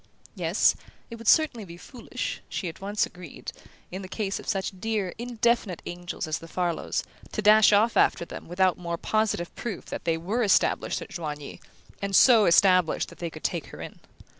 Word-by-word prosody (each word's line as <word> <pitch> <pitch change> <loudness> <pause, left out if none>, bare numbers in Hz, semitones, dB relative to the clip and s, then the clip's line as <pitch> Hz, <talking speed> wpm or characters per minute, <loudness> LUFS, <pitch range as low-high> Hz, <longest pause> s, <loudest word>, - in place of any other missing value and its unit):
Yes, - - +3 0.4
it 230 - -6
would 230 -1 -10
certainly 310 -9 +4
be 170 -3 -11
foolish 240 +6 -6
she 185 - -3
at 165 - -8
once 205 +2 0
agreed 175 -5 -9 0.4
in 185 +2 -5
the 190 - -7
case 200 0 -3
of - - -12
such 195 0 -1
dear 210 -4 -2
indefinite 235 -5 0
angels 175 0 -5
as 155 - -2
the 165 - -11
Farlows, 175 -1 -2 0.3
to 215 - -1
dash 215 0 +7
off 215 +3 +4
after 170 - +3
them - - -9
without 180 +1 +1
more 170 -1 -3
positive 215 -4 -1
proof 215 -7 -5
that - - -5
they 165 -1 +1
were 200 +9 -2
established 210 -4 +2
at - - -13
Joigny, 150 -4 -6 0.4
and 200 -1 -1
so 225 -3 +7
established 180 -1 +4
that - - -15
they 170 - -3
could - - -12
take - - -2
her - - -11
in. - - -9
190 Hz, 190 wpm, -26 LUFS, 175-220 Hz, 0.4 s, dash